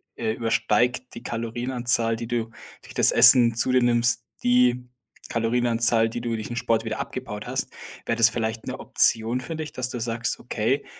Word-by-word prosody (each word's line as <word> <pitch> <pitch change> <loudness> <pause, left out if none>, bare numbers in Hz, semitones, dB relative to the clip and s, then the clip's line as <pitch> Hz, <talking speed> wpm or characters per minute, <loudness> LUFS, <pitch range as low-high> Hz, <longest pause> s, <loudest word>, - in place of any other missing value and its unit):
äh, 110 -2 -3
übersteigt 115 +2 -1
die 120 - -10
Kalorienanzahl, 120 0 -1
die 115 0 -7
du 115 -2 -3 0.3
durch - - -14
das - - +5
Essen 120 -2 +7
zu 130 +2 +1
dir 125 -1 +2
nimmst, 120 -1 +2 0.2
die 125 0 +2 0.4
Kalorienanzahl, 115 -1 +1
die 120 - -6
du 120 - -4
durch 110 -1 -6
den 120 - -7
Sport 115 -1 -1
wieder 110 0 -4
abgebaut - - -7
hast. - - -3 0.4
Wäre 115 - -2
das 115 0 +6
vielleicht 110 -1 -4
'ne - - -5
Option 115 +3 +2
für 165 +5 -7
dich, 155 -1 -6
dass 125 0 -2
du 120 - -5
sagst: 115 0 -2
„Okay, 120 +4 -2
120 Hz, 180 wpm, -23 LUFS, 115-125 Hz, 0.4 s, Essen